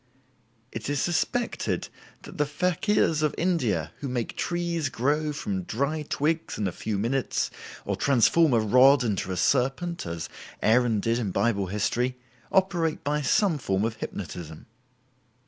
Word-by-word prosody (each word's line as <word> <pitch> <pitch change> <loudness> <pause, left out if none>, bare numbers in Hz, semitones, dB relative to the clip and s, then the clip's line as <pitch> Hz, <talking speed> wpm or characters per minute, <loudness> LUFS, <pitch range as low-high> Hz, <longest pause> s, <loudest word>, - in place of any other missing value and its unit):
It 115 +4 -5
is 145 -1 0
suspected 205 - -1 0.4
that - - -11
the 150 - +2
fakirs 170 +1 +1
of 150 -1 +1
India 115 - 0
who 140 - -4
make 125 -3 -3
trees 170 -4 -1
grow 150 +5 0
from 100 -9 -3
dry 140 - -2
twigs 155 +2 -1
in 105 - -1
a - - -2
few 105 +3 -3
minutes, 120 +6 -1 0.3
or - - -1
transform 140 +3 +4
a 115 - +4
rod 125 +5 +5
into 100 -5 -1
a 90 - -3
serpent 135 - 0
(as 85 -1 -4 0.3
Aaron 115 -1 +3
did 115 +2 +1
in 110 -5 -1
Bible 100 0 +1
history), 120 +6 -1 0.3
operate 175 -4 +1
by 150 +1 0
some 160 +4 +2
form 100 -4 0
of 115 -1 -3
hypnotism. 85 -6 -7
130 Hz, 145 wpm, -26 LUFS, 110-155 Hz, 0.4 s, rod